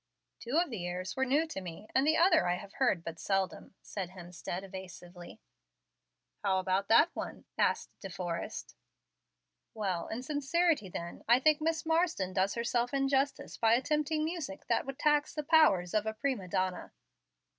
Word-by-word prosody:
"Two 245 +6 -2
of 345 -4 +2
the 180 -6 -4
airs 180 +1 -4
were 265 0 0
new 290 +5 +3
to 315 -12 -6
me, 175 +3 -8
and 270 +2 +3
the 315 - +4
other 335 - +5
I 175 - +2
have 200 +2 -9
heard 240 -10 +1
but 165 -1 -6
seldom," 195 0 -2
said 190 -4 -5
Hemstead, 180 0 -7
evasively. 180 0 -10 1.0
"How 195 -2 +2
about 190 +1 0
that 265 +10 +6
one?" - - -6
asked - - +1
De 195 - -7
Forrest. 175 +2 -5 1.0
"Well, 190 -6 -2
in 235 +3 -5
sincerity 295 - +1
then, 170 -1 -7
I 240 +2 +6
think 305 +2 +3
Miss 320 0 0
Marsden 320 - +1
does 190 +1 +1
herself 240 +2 0
injustice 275 0 0
by 225 0 +4
attempting 300 +4 0
music 315 -4 -5
that 290 - +1
would 275 -1 -5
tax 295 0 +2
the 300 - -2
powers 280 - +4
of 215 0 +1
a 220 - -2
prima 235 -5 -2
donna." 185 +1 -2
225 Hz, 165 wpm, -32 LUFS, 185-295 Hz, 1.0 s, that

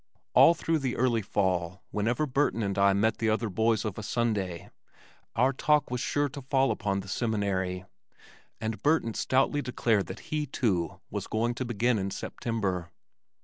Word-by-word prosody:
All 170 - +7
through 165 -1 0
the 130 -3 -2
early 120 -2 +2
fall 95 -3 -1
whenever 120 +8 0
Burton 135 -4 +1
and 100 -1 -1
I 100 0 +4
met 105 +3 +1
the 115 - +1
other 110 +1 0
boys 110 +4 +1
of 105 -1 -3
a - - -4
Sunday 100 -6 -2 0.6
our 130 +4 +3
talk 150 +1 +2
was 125 -1 -1
sure 145 0 +1
to 140 +1 -8
fall 135 0 +2
upon 100 -2 -1
the 100 - -12
Seminary, 95 -4 -1 0.7
and 110 0 -3
Burton 145 -7 +2
stoutly 135 +5 +1
declared 115 -6 0
that - - -7
he, 150 -1 0
too, 95 - -1
was - - -4
going 115 +2 0
to 130 +2 -4
begin 120 0 +1
in 95 0 -2
September. 95 -5 -3
110 Hz, 170 wpm, -28 LUFS, 100-130 Hz, 0.7 s, All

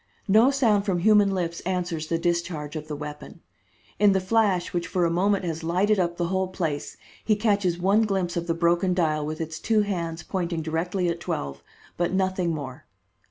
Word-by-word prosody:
No 220 +6 +6
sound 230 -8 +2
from 195 -3 0
human 210 0 +5
lips 175 -3 -2
answers 175 -3 -3
the 165 - 0
discharge 170 -3 -2
of 155 0 -5
the 150 - -4
weapon. 150 +2 -8 0.6
In 205 -1 +5
the 190 - +2
flash 190 -2 +1
which 175 -1 -1
for 180 -2 +1
a 165 - +1
moment 195 +2 +1
has 165 -1 -4
lighted 190 +5 +2
up 175 -1 0
the 175 -1 -1
whole 190 0 0
place, 165 -6 -4 0.3
he 215 - +2
catches 200 -5 +1
one 195 +5 +3
glimpse 190 -4 -1
of 170 0 -2
the 165 - 0
broken 175 +2 +2
dial 155 -4 +1
with 155 +1 -4
its 160 -1 -5
two 220 -1 +2
hands 170 -5 -3
pointing 170 -3 -2
directly 175 +4 -1
at 170 0 -1
twelve, 70 - -4 0.4
but 175 0 0
nothing 190 -2 0
more. 140 -5 -6
175 Hz, 195 wpm, -25 LUFS, 165-195 Hz, 0.6 s, No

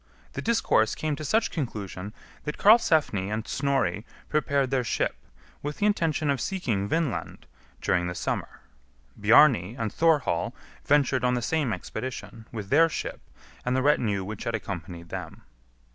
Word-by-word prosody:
The - - -4
discourse 165 - +2
came 155 -1 -2
to 155 - -6
such 220 +9 +1
conclusion 105 - -4 0.3
that 150 0 -4
Karlsefni 160 - +4
and 110 +1 -3
Snorri 135 -9 0 0.3
prepared 140 -3 +1
their 130 -2 +1
ship, 115 - -1 0.5
with 145 +1 -4
the 205 - +1
intention 160 -7 +1
of 135 -4 -1
seeking 115 - -1
Vinland 160 +2 -2 0.4
during 90 -1 +1
the 90 - -4
summer. - - -3 0.5
Bjarni 110 - +5
and 110 -3 -2
Thorhall 150 - +2 0.3
ventured 140 -3 +2
on 125 0 +3
the 120 - -1
same 150 -2 0
expedition, 120 -1 -6
with 105 -4 -6
their 165 +3 +6
ship - - -5 0.4
and 125 +1 0
the 130 - +1
retinue 110 -9 +2
which 105 +2 -6
had 115 - 0
accompanied 85 -5 -6
them. - - -7
125 Hz, 150 wpm, -27 LUFS, 105-150 Hz, 0.5 s, their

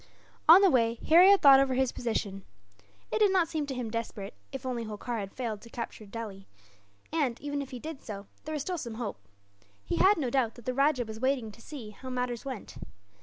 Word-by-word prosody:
On 350 +4 +11
the 390 - +7
way, 230 -2 +2
Harry 350 +4 +8
had 400 -1 +5
thought 275 -2 +9
over 270 -1 +2
his 260 -1 +2
position. 205 -5 -3 0.7
It - - 0
did 415 -2 +5
not 365 -3 +3
seem 305 -3 -3
to 270 - -4
him 240 -3 -4
desperate, 220 -3 -5 0.2
if - - -7
only 245 -2 -2
Holkar 215 0 -4
failed 220 -3 -4
to 235 - -13
capture 230 -2 -7
Delhi; 200 -3 -7 0.7
and 275 -7 0
even 285 0 -3
if 275 - -7
he 255 - -6
did 310 +3 -7
so, 200 -2 -7 0.2
there 310 - -4
was 295 -3 -2
still 360 0 -3
some 235 -5 -6
hope. 225 -3 -5 0.7
He - - -2
had 405 +2 +5
no 265 -6 -1
doubt 240 -4 +1
that 240 - -14
the 255 - -1
rajah 275 -2 +2
was 220 0 -8
waiting 260 -3 0
to 230 - -16
see 235 -6 -8
how 260 +5 -10
matters 250 -2 -2
went. 260 -6 -7
250 Hz, 220 wpm, -29 LUFS, 225-285 Hz, 0.7 s, On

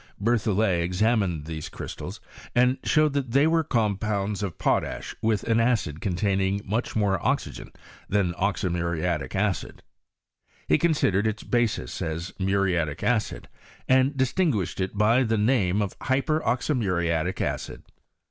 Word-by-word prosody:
Bertholiet 105 -4 +1
examined 90 -3 +1
these 80 -1 -6
crystals - - -7 0.4
and 125 +2 +3
showed 155 -2 +3
that 135 -4 -2
they 140 +2 +5
were 165 0 +3
compounds 105 -4 -1
of 95 -5 -4
potash - - -1
with 110 -2 +1
an 115 -1 +2
acid 115 -10 0
containing' 95 +1 0
moch 110 +5 -2
more 100 -4 +1
oxygen - - -2 0.4
than 95 -4 +1
oxymuriattc 85 -5 -1
acid. 95 -3 -2 0.8
He 75 - +4
considered 110 - +2
its 110 0 -3
basis 120 -5 -1
as 85 +1 -4
muriatic 95 -6 0
acid, 110 -3 0 0.4
and 130 +2 +3
distinguished 130 - 0
it 95 +2 -3
by 110 +4 +4
the 115 -3 +1
name 105 -3 +2
of 100 - -5
hyper 140 +4 +1
oxymuriatic 90 - 0
acid. - - -3
105 Hz, 130 wpm, -26 LUFS, 90-120 Hz, 0.8 s, they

